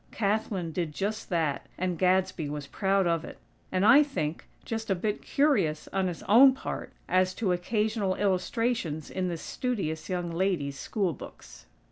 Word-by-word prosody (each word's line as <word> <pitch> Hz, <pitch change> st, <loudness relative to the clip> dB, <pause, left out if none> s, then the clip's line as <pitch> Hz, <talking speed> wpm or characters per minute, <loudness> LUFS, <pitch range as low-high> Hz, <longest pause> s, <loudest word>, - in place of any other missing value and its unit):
Kathlyn 200 Hz, -5 st, -1 dB
did 165 Hz, -2 st, -2 dB
just 215 Hz, +5 st, -3 dB
that; 160 Hz, -6 st, -1 dB
and 180 Hz, -1 st, -1 dB
Gadsby 185 Hz, -4 st, +2 dB
was 145 Hz, -1 st, -5 dB
proud 195 Hz, +5 st, +1 dB
of 165 Hz, -1 st, +1 dB
it; -, -, -9 dB, 0.3 s
and 185 Hz, +1 st, +2 dB
I 260 Hz, +7 st, +8 dB
think, 170 Hz, -, -2 dB, 0.2 s
just 225 Hz, -1 st, -4 dB
a 195 Hz, -, +3 dB
bit 210 Hz, +4 st, -2 dB
curious 195 Hz, -, +1 dB
on 190 Hz, -1 st, +1 dB
his 175 Hz, -2 st, -5 dB
own 260 Hz, +6 st, +7 dB
part -, -, -5 dB, 0.2 s
as 185 Hz, 0 st, +2 dB
to 205 Hz, -5 st, 0 dB
occasional 210 Hz, +2 st, 0 dB
illustrations 190 Hz, -4 st, -1 dB
in 185 Hz, -1 st, -1 dB
this 170 Hz, -2 st, -4 dB
studious 190 Hz, -11 st, -3 dB
young 175 Hz, -2 st, -2 dB
lady's 165 Hz, -6 st, -1 dB
school 195 Hz, -6 st, -1 dB
books! -, -, -12 dB
185 Hz, 160 wpm, -28 LUFS, 165-215 Hz, 0.3 s, I